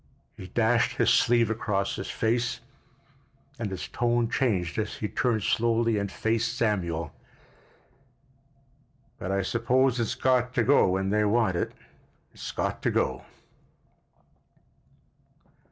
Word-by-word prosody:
He 95 - -9
dashed 115 +3 +1
his 120 - +3
sleeve 120 -2 +3
across 100 -3 -1
his 95 - -6
face, 120 +1 -1 1.0
and 110 -3 -2
his 95 -2 -5
tone 120 -1 0
changed 100 -9 0
as 105 -1 -3
he 105 - -3
turned 110 -2 0
slowly 115 0 +1
and 100 -1 -3
faced 115 +2 -1
Samuel. 85 -9 -1 2.1
"But 95 - -4
I 100 0 0
suppose 125 +4 +1
it's 120 +1 -1
got 125 -1 +1
to 120 - +3
go 135 -5 +4
when 95 +1 0
they 105 0 +2
want 105 -3 +2
it—it's - - -8
got - - -2
to - - +1
go." 65 0 -1
115 Hz, 120 wpm, -27 LUFS, 100-120 Hz, 2.1 s, go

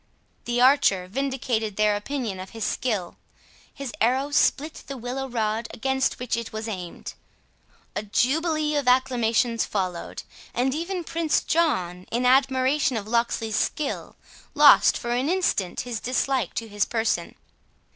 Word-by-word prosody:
The 240 0 -1
archer 245 -8 +4
vindicated 245 -2 -2
their 210 0 +3
opinion 215 -2 -4
of 185 0 -7
his 225 - -3
skill: 210 -9 -2 0.5
his 275 -4 -7
arrow 260 +5 +2
split 300 +1 +1
the 275 - -6
willow 255 +3 -4
rod 225 -1 -1
against 265 +2 0
which 250 -1 -2
it 235 -1 -5
was 220 +1 -5
aimed. 180 -5 -6 0.8
A - - -1
jubilee 300 +8 +1
of 285 -3 -1
acclamations 245 -2 +2
followed; 185 -4 -3 0.3
and 260 +2 +1
even 345 +4 -3
Prince 330 -1 0
John, 185 - 0
in 245 +2 0
admiration 265 0 +3
of 210 -1 -5
Locksley's 225 -1 0
skill, 295 +4 -2 0.4
lost - - +7
for 240 - -4
an 250 +5 0
instant 340 - 0
his 240 -3 -4
dislike 255 -3 -1
to 230 - -3
his 205 -1 0
person. 225 -1 -1
245 Hz, 140 wpm, -25 LUFS, 220-275 Hz, 0.8 s, lost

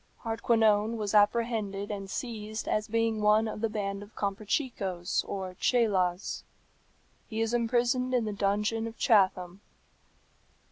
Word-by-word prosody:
Hardquanonne 225 -1 +2
was 210 -2 -3
apprehended 210 -2 +1
and 195 -2 -5
seized 215 -1 -5
as 215 0 0
being 225 -1 0
one 210 +1 +4
of 215 - -5
the 225 - +1
band 200 -2 -3
of 205 +2 -13
Comprachicos 200 - -2
or 190 -2 -5
Cheylas. 195 -7 +1 0.9
He 220 -2 -4
is 225 +1 0
imprisoned 240 +2 +1
in 245 -3 +1
the 210 - -3
dungeon 210 +3 0
of 230 - -9
Chatham. 190 -5 +2
215 Hz, 130 wpm, -29 LUFS, 200-230 Hz, 0.9 s, one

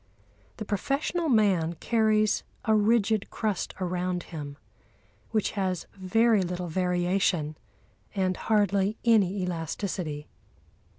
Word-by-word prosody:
The 215 - -5
professional 280 - -1
man 195 - +3
carries 215 +1 +2 0.2
a 220 - +3
rigid 215 0 +2
crust 210 -6 -2
around 180 -1 -1
him 145 -2 -6 0.7
which 215 -2 0
has 185 -4 -2
very 215 +3 +3
little 180 -1 -3
variation 180 -2 +1 0.6
and 185 -2 +1
hardly 205 -1 +1
any 200 -4 +3
elasticity. 165 -2 -3
195 Hz, 100 wpm, -27 LUFS, 180-215 Hz, 0.7 s, man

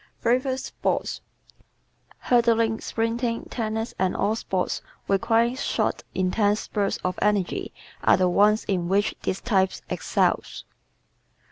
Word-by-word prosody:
Favorite 255 +2 +1
Sports 265 - -2 0.4
¶ - - -32
Hurdling, 230 -2 +2
sprinting, 230 +1 -1
tennis 225 -1 -2
and 185 -1 +1
all 210 +2 +1
sports 190 -4 -2 0.3
requiring 230 +5 +2
short, 260 - -1
intense 205 +3 +1
spurts 200 -2 -1
of 185 0 -2
energy 205 -3 0 0.3
are - - +5
the 185 0 +3
ones 210 +4 +4
in 180 -3 -1
which 200 +2 +2
this 185 - -2
type 190 -5 +2 0.2
excels. - - 0
215 Hz, 120 wpm, -25 LUFS, 190-230 Hz, 0.4 s, are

